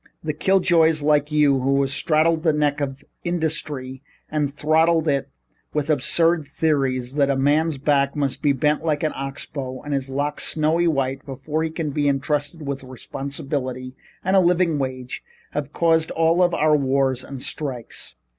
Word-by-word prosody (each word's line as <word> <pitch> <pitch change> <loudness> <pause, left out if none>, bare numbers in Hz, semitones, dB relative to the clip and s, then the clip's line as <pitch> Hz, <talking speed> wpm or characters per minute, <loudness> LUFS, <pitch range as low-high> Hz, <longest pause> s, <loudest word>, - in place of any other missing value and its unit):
The 155 -1 -2
killjoys 165 -3 +3
like 150 0 +2
you 145 -3 +4
who 135 +2 +2
have 135 -1 -1
straddled 160 +2 +2
the 160 -2 +2
neck 150 -1 +1
of 140 -1 -4 0.2
industry 150 -6 -3 0.3
and 150 -2 0
throttled 160 +2 +2
it 140 -2 0 0.5
with 150 +1 +1
absurd 165 +2 +2
theories 135 -6 0
that 140 -1 +2
a 140 - +2
man's 145 +3 +2
back 140 0 +1
must 140 -3 -1
be 145 - +3
bent 150 +3 +1
like 155 -2 0
an 155 - +1
ox 135 0 -5
bow 130 -3 -6
and 145 - -4
his 135 -1 -2
locks 145 +2 -2
snowy 160 +2 +1
white 135 -3 0
before 145 +3 -3
he 160 - 0
can 160 -2 -3
be 145 0 +1
entrusted 145 +3 -1
with 140 -1 -4
responsibility 130 0 -5 0.3
and 190 +1 +2
a - - +7
living 175 -3 +2
wage, 130 -2 -4 0.3
have 145 -1 -4
caused 165 -1 +2
all 165 +2 +2
of 180 -1 +4
our 155 0 +3
wars 135 -2 +1
and 135 -2 -7
strikes. 125 - -5
145 Hz, 170 wpm, -22 LUFS, 135-160 Hz, 0.5 s, a